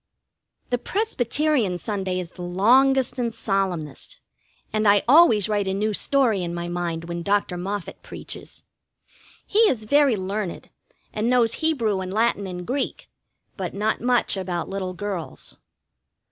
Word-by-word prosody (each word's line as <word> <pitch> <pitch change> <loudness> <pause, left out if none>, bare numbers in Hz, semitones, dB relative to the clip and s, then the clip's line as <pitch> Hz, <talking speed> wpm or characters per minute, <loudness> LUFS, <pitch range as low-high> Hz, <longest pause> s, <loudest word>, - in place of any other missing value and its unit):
The 245 - +1
Presbyterian 290 - 0
Sunday 190 -2 -2
is 175 -1 -6
the 180 - -11
longest 255 +10 +3
and 235 -2 -1
solemnest, 180 -8 -2 0.5
and 215 0 +2
I 200 0 +5
always 255 - +6
write 205 -2 0
a 190 - 0
new 210 +2 0
story 235 -4 +2
in 170 -1 -3
my 170 0 -4
mind 175 -1 -3
when 170 0 -4
Dr. 200 -1 0
Moffett 195 +2 -5
preaches. - - -9 0.8
He 415 - 0
is 220 -4 -1
very 280 0 +3
learned, 190 -1 -4 0.4
and 215 +2 0
knows 240 -2 +3
Hebrew 230 -12 +1
and 185 0 -5
Latin 215 -1 +1
and 180 -1 -6
Greek, 265 +5 -3 0.4
but 185 -2 -5
not 215 +2 0
much 245 -2 +2
about 180 -3 -3
little 190 -1 -3
girls. 190 -3 -6
205 Hz, 145 wpm, -24 LUFS, 185-240 Hz, 0.8 s, always